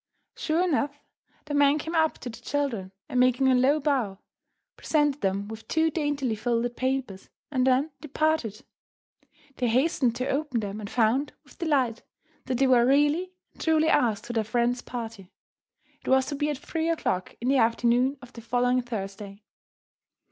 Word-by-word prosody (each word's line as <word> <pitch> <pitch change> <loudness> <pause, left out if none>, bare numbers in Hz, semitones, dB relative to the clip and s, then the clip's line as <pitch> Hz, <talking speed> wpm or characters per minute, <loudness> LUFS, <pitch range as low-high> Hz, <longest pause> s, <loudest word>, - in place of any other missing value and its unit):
Sure 325 +3 0
enough, 290 -4 0 0.5
the 300 - -5
man 285 0 +4
came 320 +2 -5
up 320 -1 +2
to - - -9
the 230 - -11
children, 240 -9 -2 0.2
and, 250 - -1
making 255 +1 +4
a 260 - +5
low 265 +4 +3
bow, 260 -9 0 0.6
presented 295 -2 +1
them 195 +1 -1
with 220 +1 -9
two 320 0 +2
daintily 290 -6 -1
folded 235 +2 -1
papers 255 -7 -3 0.2
and 260 -2 +1
then 265 +4 +2
departed. 305 -7 -1 0.9
They 250 - 0
hastened 255 0 +2
to 255 +2 -2
open 275 -4 -1
them, 205 0 -5
and 205 -2 -6
found, 245 +5 +1
with - - -20
delight, 270 -9 +1 0.4
that 255 -2 -1
they 270 - +3
were 250 -2 +5
really 295 +7 +2 0.2
and - - -14
truly 320 -1 +3
asked 220 -4 +2
to 240 - -6
their 225 -2 +1
friend's 240 +3 0
party. 225 -6 -7 0.7
It - - -16
was 265 0 +4
to 290 - -3
be 295 +1 -1
at 295 - -2
three 325 +4 -3
o'clock 185 - -1
in 240 - -3
the 275 - +4
afternoon 240 +3 +2
of 250 - -13
the 230 - -10
following 245 +2 +1
Thursday. 200 -3 -7
255 Hz, 170 wpm, -26 LUFS, 230-290 Hz, 0.9 s, a